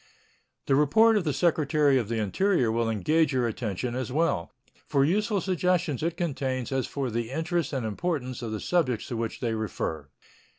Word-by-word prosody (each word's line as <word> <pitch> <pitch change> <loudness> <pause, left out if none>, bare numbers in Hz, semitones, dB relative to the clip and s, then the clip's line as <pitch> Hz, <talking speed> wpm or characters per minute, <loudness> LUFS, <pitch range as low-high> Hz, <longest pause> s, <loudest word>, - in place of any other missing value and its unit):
The - - +1
report 220 +11 +5
of 200 -5 +1
the 150 - +1
Secretary 150 -2 +2
of 115 -4 -4
the 115 - -1
Interior 125 - +1
will 115 0 0
engage 150 +7 +2
your 125 -2 +1
attention 115 +1 -3
as 125 -1 -3
well 145 - 0 0.4
for 140 -1 +3
useful 205 +4 +1
suggestions 180 -5 0
it 165 +1 -2
contains 135 -7 -2
as 135 -1 0
for 135 -4 -3
the 115 0 -2
interest 160 +2 -1
and 130 -5 -2
importance 130 - -3
of 115 -2 -4
the 110 - -3
subjects 130 -10 0
to 120 - -3
which 115 -1 -4
they 115 -3 0
refer. 80 -9 -3
135 Hz, 180 wpm, -27 LUFS, 115-165 Hz, 0.4 s, report